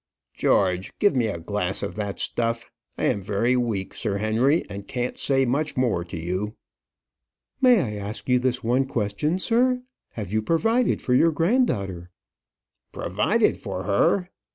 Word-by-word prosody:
George, 95 -1 +1
give 205 -6 +3
me 120 -3 +2
a 100 - -3
glass 95 +2 -1
of - - -3
that 100 -2 -4
stuff. 115 0 -1 0.3
I - - -4
am 100 - +1
very 105 +5 +1
weak, 115 -6 -1
Sir 100 - -2
Henry, 115 +9 +2
and 100 0 -8
can't 125 -1 -2
say 135 -1 +2
much 145 +5 -1
more 120 -9 +1
to 85 -1 -7
you." 95 +6 -3 1.1
"May 250 -5 +6
I 105 -6 -4
ask 105 - -6
you 125 -1 +4
this 125 0 -1
one 125 +4 +1
question, 120 - -1
sir? 250 +5 +2 0.3
Have 105 -3 -6
you 110 - +2
provided 225 - +1
for 125 - +1
your 165 +6 +5
granddaughter?" 140 - 0 0.8
"Provided - - +1
for 90 - -5
her!" 180 - +2
115 Hz, 155 wpm, -24 LUFS, 100-150 Hz, 1.1 s, May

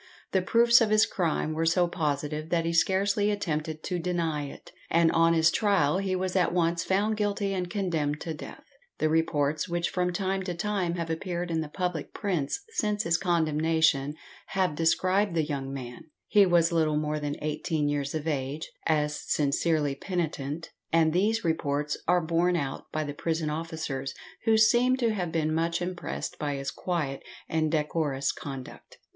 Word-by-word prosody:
The 190 - +2
proofs 235 +5 +5
of 225 - +3
his 215 +1 +5
crime 165 -7 -1
were 165 +1 0
so 175 +1 +3
positive 150 -2 -2
that 170 -2 +1
he 165 - 0
scarcely 200 +4 +2
attempted 155 -6 -2
to 180 -2 -2
deny 165 -4 -1
it, - - -12 0.2
and 165 0 +4
on 165 0 +4
his 160 +1 +4
trial 190 -6 +2
he 190 -1 -1
was 185 0 -2
at 180 -3 +3
once 170 -1 +1
found 210 +3 +1
guilty 205 -1 0
and 180 -2 -2
condemned 160 -7 -1
to 165 - -3
death. 150 - -9 0.3
The 155 - +1
reports 155 -1 +1
which 175 0 -1
from 180 -1 0
time 190 +1 -1
to 180 -2 -3
time 185 -2 -1
have 165 -2 -3
appeared 175 +1 -3
in 160 -1 0
the 155 - -5
public 180 -2 -3
prints 185 - -1
since 210 - 0
his 170 0 +2
condemnation 160 -4 +2 0.3
have 185 -4 0
described 185 +4 +2
the 160 - +2
young 140 -2 -4
man 125 +1 -7 0.2
he 205 -2 +5
was 170 -1 +4
little 155 -2 +2
more 150 0 -1
than 145 0 -3
eighteen 155 0 -1
years 145 0 -1
of 155 0 -3
age 145 +1 -3 0.2
as 150 -2 0
sincerely 150 0 +1
penitent, 160 -2 -3 0.2
and 160 -1 +3
these 210 +4 +1
reports 150 -2 0
are 180 +1 +4
borne 170 +2 +2
out 140 -5 -4
by 155 - -1
the 145 -1 -5
prison 160 0 -1
officers, 155 -4 -4 0.3
who 220 -1 +5
seemed 240 +3 +4
to 235 -4 +1
have 180 -5 -2
been 155 -1 0
much 165 +1 0
impressed 180 0 -4
by 145 -1 -1
his 140 0 -3
quiet 155 -7 -2 0.3
and 155 -1 0
decorous 150 -3 0
conduct. 135 -3 -9
165 Hz, 175 wpm, -28 LUFS, 150-185 Hz, 0.3 s, proofs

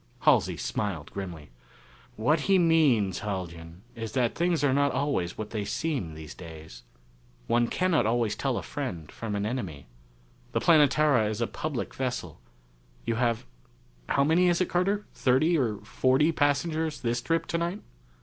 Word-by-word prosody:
Halsey - - +3
smiled 90 -8 -3
grimly. 85 -8 -7 0.6
"What 145 +9 +2
he 195 - +6
means, 150 - +3
Haljan, 85 -3 -6
is 115 -1 -6
that 125 -3 +1
things 170 -2 +1
are 140 -2 +3
not 140 0 +3
always 130 -10 -1
what 105 -1 -5
they 105 -2 -2
seem 110 - -2
these 80 -1 -9
days. 80 -7 -11 0.6
One 120 - +2
cannot 165 -9 +1
always 115 -2 +1
tell - - -1
a - - -4
friend 80 -3 -5
from 110 -2 -4
an 100 0 -1
enemy. 95 - -4 0.7
The - - +2
Planetara 150 -7 +4
is 110 0 -3
a 120 - +1
public 145 +1 -4
vessel. 125 - -4 0.6
You 115 - 0
have 115 - 0 0.6
how 140 - +3
many 165 +5 +4
is 175 -1 +3
it, 185 - +1
Carter? 195 +4 +1
thirty 140 +7 +3
or 120 -9 +1
forty 130 +7 +2
passengers 155 +1 0
this 120 0 -1
trip 165 +4 0
tonight?" 170 +5 -2
125 Hz, 155 wpm, -28 LUFS, 100-155 Hz, 0.7 s, he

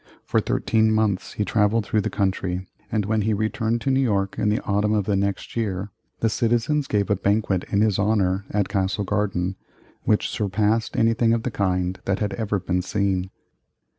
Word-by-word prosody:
For - - +2
thirteen 110 -1 +1
months 110 -4 0
he 105 - -1
travelled 105 +1 +2
through 105 - +1
the - - -2
country, 95 -1 -1 0.3
and 105 -2 0
when 110 +1 +1
he 110 +1 +1
returned 110 +2 -1
to 135 - 0
New 135 - +3
York 100 -7 +1
in 105 - +2
the 105 - +1
autumn 105 +1 +1
of 105 -3 +1
the 100 - +1
next 100 0 -2
year, 100 -3 -2 0.3
the 115 - +3
citizens 120 +6 +1
gave 105 -1 0
a - - +4
banquet 100 -1 0
in 100 - +1
his 105 -3 +2
honor, 100 -2 +1
at 105 -2 0
Castle 95 +1 0
Garden, 95 -2 -1 0.4
which 105 - +1
surpassed 105 +2 0
anything 115 0 +3
of 115 -1 0
the 125 - -2
kind 90 -2 -1
that 95 0 +1
had 105 -1 -2
ever 105 -3 -1
been 90 0 -1
seen. 95 -1 -1
105 Hz, 190 wpm, -23 LUFS, 95-110 Hz, 0.4 s, a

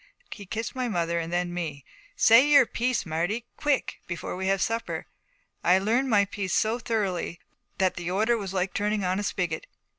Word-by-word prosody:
He 200 -3 -8
kissed 225 +4 -4
my 255 -2 -2
mother 170 -5 0
and 165 0 -4
then 175 0 -1
me. 155 -6 -4 0.3
'Say 235 +6 +6
your 285 -3 +7
piece, 240 -1 -1
Marty 175 +9 -2
quick! 290 -3 0
Before 175 0 -4
we 190 +1 -3
have 195 0 +2
supper.' 230 +4 -2 0.6
I 180 - +5
had 190 +1 +3
learned 245 +6 +1
my 205 -3 +4
piece 200 -2 -3
so 225 +3 +1
thoroughly 195 -7 -2 0.4
that 190 -1 +1
the 175 0 -3
order 215 +6 +2
was 200 -5 -4
like 185 -1 -1
turning 210 0 0
on 185 +2 0
a - - -2
spigot. 175 -5 -2
195 Hz, 190 wpm, -27 LUFS, 175-225 Hz, 0.6 s, your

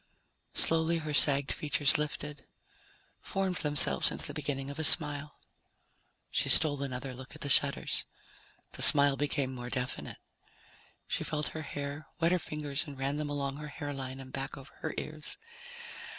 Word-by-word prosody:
Slowly 165 +1 +2
her 155 -2 -5
sagged 140 -1 +6
features 145 -1 +2
lifted, 150 -1 -5 0.7
formed 190 -2 -3
themselves 145 -1 +3
into - - -6
the - - -7
beginning 140 -2 -5
of 145 - -10
a - - -2
smile. 150 -1 +3 0.9
She - - 0
stole 145 -3 +6
another 130 -1 -6
look 130 +3 -11
at 150 - -15
the 140 - -2
shutters. 140 0 +4 0.7
The - - -7
smile 140 -1 +8
became 140 -2 -2
more 125 -1 -8
definite. 125 0 -5 0.9
She - - -3
felt 150 -1 -3
her 160 - -7
hair, 145 0 -7
wet 165 +1 +1
her 180 - +1
fingers 150 -1 -4
and 140 -2 -10
ran 135 +2 -3
them 150 -1 -4
along 140 -1 -4
her 150 0 -8
hairline 135 -3 -7
and 130 -1 -12
back 135 +1 -5
over 135 +1 -13
her - - -5
ears. 155 -1 -6
145 Hz, 160 wpm, -29 LUFS, 135-150 Hz, 0.9 s, smile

